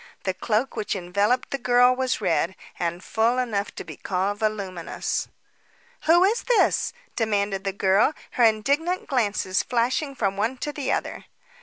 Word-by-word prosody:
The 190 Hz, -, 0 dB
cloak 220 Hz, +7 st, -1 dB
which 210 Hz, -, -2 dB
enveloped 200 Hz, +7 st, 0 dB
the 275 Hz, -, -2 dB
girl 250 Hz, 0 st, +4 dB
was 260 Hz, -3 st, -1 dB
red, 170 Hz, 0 st, +1 dB, 0.2 s
and 175 Hz, +1 st, -2 dB
full 230 Hz, +3 st, +1 dB
enough 220 Hz, -5 st, -1 dB
to -, -, -6 dB
be -, -, -10 dB
called 195 Hz, +2 st, -2 dB
voluminous. 200 Hz, -6 st, -2 dB, 0.8 s
"Who 345 Hz, +3 st, +6 dB
is 425 Hz, +5 st, +2 dB
this?" -, -, +2 dB, 0.2 s
demanded 200 Hz, -3 st, 0 dB
the 195 Hz, -, 0 dB
girl, 195 Hz, +8 st, +2 dB, 0.2 s
her 245 Hz, -, +1 dB
indignant 280 Hz, +11 st, +2 dB
glances 210 Hz, -8 st, 0 dB
flashing 255 Hz, +4 st, 0 dB
from 195 Hz, -5 st, -1 dB
one 225 Hz, +6 st, 0 dB
to 295 Hz, +3 st, -4 dB
the 290 Hz, -, -2 dB
other. -, -, -3 dB
220 Hz, 155 wpm, -24 LUFS, 195-255 Hz, 0.8 s, Who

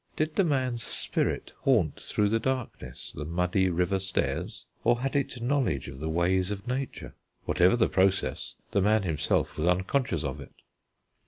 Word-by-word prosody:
Did 155 Hz, 0 st, 0 dB
the 195 Hz, -, +4 dB
man's 130 Hz, -7 st, 0 dB
spirit -, -, -2 dB
haunt 105 Hz, -, +2 dB
through 105 Hz, -1 st, +1 dB
the 115 Hz, +2 st, +2 dB
darkness 120 Hz, -, -4 dB
the -, -, -5 dB
muddy 90 Hz, +4 st, +1 dB
river 90 Hz, +2 st, +1 dB
stairs; 95 Hz, -1 st, -2 dB, 0.2 s
or 120 Hz, +1 st, +3 dB
had 135 Hz, +1 st, -2 dB
it 130 Hz, -4 st, -1 dB
knowledge 135 Hz, 0 st, 0 dB
of 65 Hz, -1 st, -8 dB
the 80 Hz, +2 st, -3 dB
ways 90 Hz, +3 st, +2 dB
of 100 Hz, +1 st, -5 dB
Nature? 130 Hz, +2 st, -4 dB, 0.3 s
Whatever 90 Hz, +4 st, +4 dB
the 120 Hz, -, +3 dB
process, 95 Hz, 0 st, +1 dB, 0.2 s
the 100 Hz, -, +2 dB
man 105 Hz, +1 st, +3 dB
himself 80 Hz, -5 st, 0 dB
was 80 Hz, -, +1 dB
unconscious 95 Hz, -, +1 dB
of -, -, -4 dB
it. -, -, -12 dB
100 Hz, 165 wpm, -28 LUFS, 90-125 Hz, 0.3 s, the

